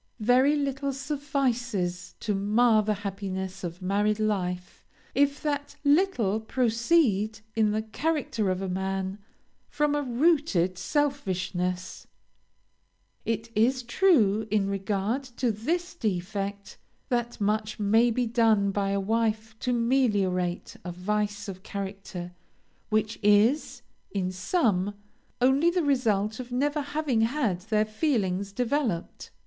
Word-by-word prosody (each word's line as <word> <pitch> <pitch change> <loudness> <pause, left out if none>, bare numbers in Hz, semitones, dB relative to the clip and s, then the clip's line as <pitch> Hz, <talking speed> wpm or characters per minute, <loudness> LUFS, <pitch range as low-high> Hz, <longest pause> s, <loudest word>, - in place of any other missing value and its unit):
Very 255 +6 +4
little 275 -1 -1
suffices 245 - -2
to 210 - -1
mar 215 +3 +3
the 215 0 0
happiness 190 -1 -4
of 175 +1 -6
married 205 +3 +1
life, 180 -4 -2 0.3
if 285 0 +2
that 285 -1 -2
little 285 - +3
proceed 225 - +1
in 220 -1 +3
the 215 +1 -1
character 230 -3 -1
of 185 +1 -1
a - - -2
man, 190 +1 -2 0.5
from 295 -1 +1
a 295 - +1
rooted 250 - +2
selfishness. 185 - -2 1.2
"It 225 +1 -2
is 250 +4 +2
true, 235 - +3
in 205 -2 +1
regard 200 +5 -1 0.2
to 245 -3 +1
this 335 - -2
defect, 200 - -3 0.3
that 240 -2 -1
much 215 +1 -1
may 220 +4 +4
be 245 +2 0
done 225 -4 +3
by 195 0 0
a 200 0 +1
wife 220 +1 -1
to 250 - -1
meliorate 205 -8 +1
a 180 - -5
vice 205 +3 -2
of 190 -1 -7
character 195 -3 -6 0.6
which 215 0 0
is, 210 +7 +3 0.3
in 185 -2 -2
some, 195 - 0 0.4
only 265 +6 +4
the 350 0 0
result 220 -6 +1
of 250 -1 -7
never 290 +4 0
having 285 -5 0
had 225 -6 +1
their 215 +2 +1
feelings 210 - -1
developed. 245 - -2
215 Hz, 120 wpm, -27 LUFS, 195-260 Hz, 1.2 s, Very